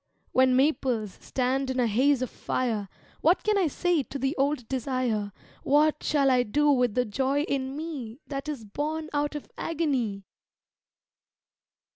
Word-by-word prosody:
When 260 Hz, 0 st, +4 dB
maples 255 Hz, -7 st, +1 dB
stand 265 Hz, +1 st, -1 dB
in 260 Hz, 0 st, -1 dB
a 245 Hz, -, +3 dB
haze 255 Hz, +4 st, +3 dB
of 255 Hz, -, -4 dB
fire 220 Hz, -6 st, -2 dB, 0.3 s
What 340 Hz, +4 st, +3 dB
can 425 Hz, 0 st, +2 dB
I 385 Hz, -4 st, +3 dB
say 345 Hz, +2 st, +1 dB
to 275 Hz, -, -6 dB
the 270 Hz, +3 st, -1 dB
old 275 Hz, -3 st, 0 dB
desire, 255 Hz, -5 st, -1 dB, 0.3 s
What 300 Hz, +2 st, +3 dB
shall 280 Hz, -3 st, +2 dB
I 250 Hz, -1 st, +4 dB
do 290 Hz, +6 st, +2 dB
with 250 Hz, -5 st, +2 dB
the 250 Hz, 0 st, +2 dB
joy 265 Hz, +6 st, 0 dB
in 270 Hz, -2 st, -2 dB
me 280 Hz, -7 st, -6 dB
That 275 Hz, +1 st, -5 dB
is 265 Hz, -7 st, -5 dB
born 310 Hz, +8 st, -3 dB
out 290 Hz, +1 st, 0 dB
of 295 Hz, -, -6 dB
agony? 265 Hz, -12 st, -1 dB
270 Hz, 155 wpm, -27 LUFS, 250-295 Hz, 0.3 s, When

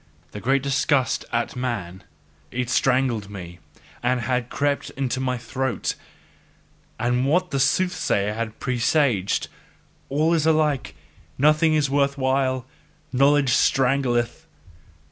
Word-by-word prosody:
The 105 Hz, -, -8 dB
great 135 Hz, +2 st, +1 dB
disgust 135 Hz, -1 st, +1 dB
at 115 Hz, 0 st, -1 dB
man 100 Hz, -8 st, -4 dB, 0.5 s
IT 125 Hz, +4 st, -3 dB
strangled 125 Hz, -6 st, +1 dB
me 90 Hz, -3 st, -9 dB, 0.4 s
and 125 Hz, 0 st, +1 dB
had 125 Hz, +1 st, -1 dB
crept 140 Hz, 0 st, -1 dB
into 130 Hz, -1 st, -1 dB
my 130 Hz, -1 st, -1 dB
throat: 130 Hz, +2 st, -2 dB, 1.1 s
and 125 Hz, +3 st, +1 dB
what 180 Hz, +5 st, +1 dB
the 135 Hz, -, 0 dB
soothsayer 135 Hz, -, +1 dB
had 110 Hz, 0 st, -5 dB
presaged: 125 Hz, -5 st, +1 dB, 0.6 s
"All 155 Hz, +4 st, +2 dB
is 160 Hz, -2 st, +2 dB
alike, 150 Hz, -, +1 dB, 0.4 s
nothing 155 Hz, +3 st, +4 dB
is 150 Hz, -2 st, +2 dB
worth 140 Hz, 0 st, +1 dB
while, 130 Hz, -1 st, 0 dB, 0.5 s
knowledge 140 Hz, 0 st, +4 dB
strangleth." 125 Hz, -3 st, +1 dB
130 Hz, 115 wpm, -23 LUFS, 120-140 Hz, 1.1 s, nothing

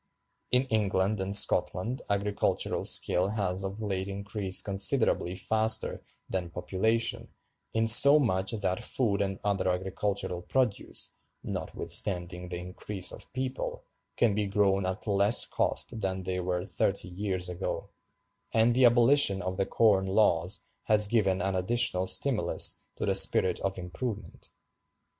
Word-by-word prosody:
In 125 Hz, +1 st, +2 dB
England 100 Hz, -1 st, 0 dB
and 95 Hz, +1 st, -1 dB
Scotland 110 Hz, +4 st, +3 dB
agricultural 100 Hz, 0 st, -2 dB
skill 90 Hz, +2 st, +3 dB
has 100 Hz, -3 st, -2 dB
of 100 Hz, +3 st, -6 dB
late 95 Hz, -2 st, -3 dB
increased 100 Hz, -1 st, -1 dB
considerably 100 Hz, -2 st, +2 dB
faster 110 Hz, +2 st, +1 dB, 0.3 s
than 90 Hz, -2 st, -4 dB
population, 110 Hz, +7 st, -2 dB, 0.4 s
insomuch 115 Hz, -3 st, +5 dB
that 95 Hz, -4 st, -2 dB
food 105 Hz, -6 st, -1 dB
and 95 Hz, -1 st, -3 dB
other 100 Hz, -2 st, -1 dB
agricultural 95 Hz, 0 st, -3 dB
produce, 125 Hz, +2 st, -1 dB, 0.3 s
notwithstanding 90 Hz, -2 st, 0 dB
the 90 Hz, -, -5 dB
increase 90 Hz, +2 st, -3 dB
of -, -, -11 dB
people, 130 Hz, 0 st, -5 dB, 0.3 s
can 115 Hz, -4 st, +2 dB
be 105 Hz, 0 st, -2 dB
grown 100 Hz, -1 st, 0 dB
at 95 Hz, +2 st, -5 dB
less 100 Hz, +1 st, +3 dB
cost 110 Hz, -, -1 dB
than 95 Hz, -1 st, -3 dB
they 90 Hz, 0 st, -4 dB
were 90 Hz, 0 st, -3 dB
thirty 100 Hz, -2 st, -2 dB
years 95 Hz, 0 st, -4 dB
ago; 90 Hz, +1 st, -6 dB, 0.6 s
and 115 Hz, +1 st, +3 dB
the 130 Hz, +1 st, +3 dB
abolition 120 Hz, -3 st, +4 dB
of 95 Hz, 0 st, -5 dB
the 95 Hz, -, -1 dB
Corn 100 Hz, -4 st, +2 dB
Laws 95 Hz, -2 st, +1 dB, 0.2 s
has 105 Hz, -1 st, +5 dB
given 95 Hz, -4 st, 0 dB
an 95 Hz, 0 st, -2 dB
additional 95 Hz, -1 st, +1 dB
stimulus 105 Hz, +6 st, +2 dB
to -, -, -4 dB
the -, -, 0 dB
spirit -, -, +3 dB
of 95 Hz, 0 st, -4 dB
improvement. 100 Hz, +4 st, -7 dB
100 Hz, 130 wpm, -28 LUFS, 95-110 Hz, 0.6 s, insomuch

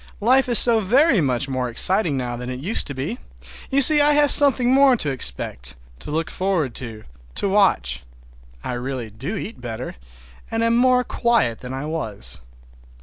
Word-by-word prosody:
Life 255 Hz, +4 st, +2 dB
is 240 Hz, -, +4 dB
very 235 Hz, -, +3 dB
much 130 Hz, -1 st, 0 dB
more 130 Hz, -2 st, -3 dB
exciting 170 Hz, -, +1 dB
now 125 Hz, -2 st, -4 dB
than 125 Hz, +1 st, -7 dB
it 125 Hz, 0 st, -6 dB
used 185 Hz, +11 st, -1 dB
to 145 Hz, -, -5 dB
be. 150 Hz, -, -5 dB, 0.5 s
You 275 Hz, 0 st, +4 dB
see 300 Hz, +2 st, +7 dB
I 295 Hz, +1 st, +4 dB
have 290 Hz, -1 st, +4 dB
something 260 Hz, -3 st, +3 dB
more 270 Hz, -1 st, +5 dB
to 150 Hz, -9 st, -2 dB
expect, 60 Hz, -, -1 dB, 0.2 s
to -, -, -8 dB
look 160 Hz, +2 st, -3 dB
forward 180 Hz, -9 st, -2 dB
to, 110 Hz, -3 st, -9 dB, 0.3 s
to -, -, -1 dB
watch. 130 Hz, -, +1 dB, 0.6 s
I -, -, -4 dB
really 125 Hz, -2 st, -5 dB
do 135 Hz, -, -6 dB
eat 220 Hz, -, -8 dB
better, 120 Hz, -, -7 dB, 0.5 s
and 225 Hz, 0 st, -2 dB
am 230 Hz, 0 st, +2 dB
more 250 Hz, +1 st, +3 dB
quiet 235 Hz, -, 0 dB
than 125 Hz, -, -9 dB
I 135 Hz, +2 st, -5 dB
was. 110 Hz, -, -5 dB
160 Hz, 175 wpm, -21 LUFS, -, 0.6 s, see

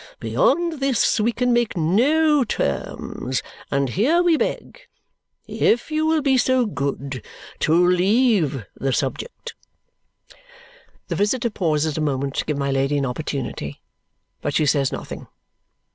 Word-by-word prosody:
Beyond 345 Hz, -, +1 dB
this, 270 Hz, -4 st, +2 dB
we 220 Hz, +3 st, +2 dB
can 250 Hz, +1 st, +1 dB
make 240 Hz, -5 st, +1 dB
no 280 Hz, -, +3 dB
terms; 130 Hz, -, -3 dB, 0.3 s
and 140 Hz, -1 st, 0 dB
here 290 Hz, -, +2 dB
we 345 Hz, -2 st, +4 dB
beg -, -, -3 dB, 0.6 s
if 240 Hz, +7 st, +1 dB
you 310 Hz, +1 st, +1 dB
will 315 Hz, -2 st, +2 dB
be 265 Hz, -2 st, +3 dB
so 255 Hz, 0 st, +2 dB
good 140 Hz, -, -4 dB, 0.4 s
to 170 Hz, +3 st, +3 dB
leave 180 Hz, -, +2 dB
the 135 Hz, -1 st, -1 dB
subject." -, -, -4 dB, 1.6 s
The -, -, -1 dB
visitor 235 Hz, +4 st, 0 dB
pauses 155 Hz, -5 st, 0 dB
a -, -, -1 dB
moment 140 Hz, -2 st, -1 dB
to -, -, 0 dB
give 150 Hz, -2 st, -2 dB
my 140 Hz, -1 st, -1 dB
Lady 135 Hz, +2 st, +1 dB
an 140 Hz, -, 0 dB
opportunity, 125 Hz, -, -4 dB, 0.6 s
but 145 Hz, -, -2 dB
she 155 Hz, -, +3 dB
says 140 Hz, -2 st, +2 dB
nothing. -, -, -7 dB
180 Hz, 135 wpm, -22 LUFS, -, 1.6 s, we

